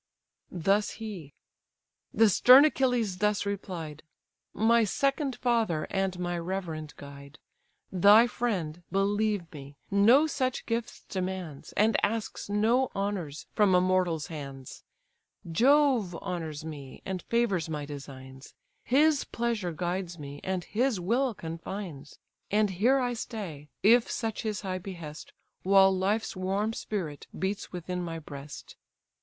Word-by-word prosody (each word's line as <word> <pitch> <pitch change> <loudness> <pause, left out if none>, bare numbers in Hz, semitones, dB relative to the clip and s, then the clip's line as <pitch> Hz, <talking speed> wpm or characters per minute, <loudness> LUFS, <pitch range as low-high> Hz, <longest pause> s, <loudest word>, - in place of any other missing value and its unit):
Thus 195 +4 +1
he: 195 -10 -8 0.8
the 225 - +5
stern 255 +7 +8
Achilles 245 -10 +1
thus 210 -1 +1
replied: 180 -7 -5 0.5
"My 230 +3 +3
second 275 - 0
father, 225 -10 0
and 195 -1 -1
my 175 -1 -2
reverend 165 -4 -4
guide: 140 +1 -11 0.5
Thy 205 +5 +7
friend, 185 -10 -2
believe 200 -2 0
me, 140 -1 -10
no 225 +9 +6
such 260 -4 -2
gifts 230 0 -3
demands, 185 -6 -5
And 220 +2 +2
asks 215 -1 -2
no 230 +5 +2
honours 195 -7 -3
from 205 -4 +4
a - - +6
mortal's 180 -4 +1
hands; 135 -4 -8 0.7
Jove 250 - +3
honours 165 -5 -5
me, 145 -4 -9
and 190 -2 -3
favours 210 -9 0
my 150 -2 -3
designs; 135 -2 -10 0.3
His 295 +3 +3
pleasure 230 -6 -2
guides 175 +1 -3
me, 145 -1 -8
and 185 -1 -2
his 240 +1 0
will 235 +6 0
confines; 165 -3 -7 0.3
And 210 -1 +2
here 230 +9 +3
I 250 -2 0
stay 185 - -6
(if 230 +3 +5
such 225 -2 -3
his 215 -3 -3
high 185 -2 -3
behest) 170 -5 -8 0.3
While 195 0 +5
life's 200 +4 0
warm 195 +4 -1
spirit 175 -11 -5
beats 195 +2 -3
within 180 0 -4
my 165 -2 -4
breast. 145 -2 -10
190 Hz, 125 wpm, -28 LUFS, 165-225 Hz, 0.8 s, stern